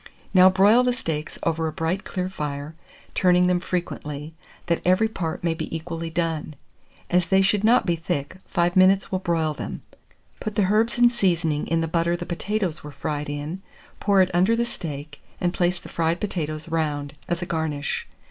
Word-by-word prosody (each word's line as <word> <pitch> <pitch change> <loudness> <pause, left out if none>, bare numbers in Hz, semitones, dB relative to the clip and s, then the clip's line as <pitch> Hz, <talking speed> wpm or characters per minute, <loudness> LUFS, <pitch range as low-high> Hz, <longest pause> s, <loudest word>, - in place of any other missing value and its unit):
Now 185 0 +8
broil 200 +6 +5
the 250 0 +2
steaks 160 -10 -4
over 165 -1 0
a - - -2
bright 165 +5 -2
clear 185 -1 -2
fire, 150 -4 -5 0.4
turning 180 -1 +4
them 180 0 +3
frequently, 155 -4 -4 0.3
that 170 -1 0
every 185 +5 +4
part 175 -8 -4
may 170 -1 +2
be 165 0 -5
equally 165 0 -4
done: 165 -2 -2 0.6
as 175 -1 +3
they 190 +2 +4
should 200 +1 +2
not 235 +3 +5
be 170 - +2
thick, 165 -1 -3
5 175 -1 +1
minutes 190 +1 +5
will 185 - 0
broil 165 -4 0
them. - - -6 0.6
Put 215 -1 -4
the 205 - +3
herbs 225 +3 +2
and 240 0 +6
seasoning 170 -9 +1
in 165 0 +1
the 165 - -1
butter 170 +1 +1
the 175 - -5
potatoes 185 -1 -2
were 150 - -7
fried 145 +1 -4
in, 145 +6 -4 0.4
pour 200 -2 +4
it 185 - -2
under 185 +6 +4
the 235 +1 +1
steak, 150 -8 -6 0.2
and 175 0 0
place 180 0 +1
the - - -12
fried 165 +1 0
potatoes 155 -6 -3
round, 150 -3 -1
as 175 +1 -1
a - - -3
garnish. 160 -4 -2
170 Hz, 185 wpm, -24 LUFS, 160-185 Hz, 0.6 s, Now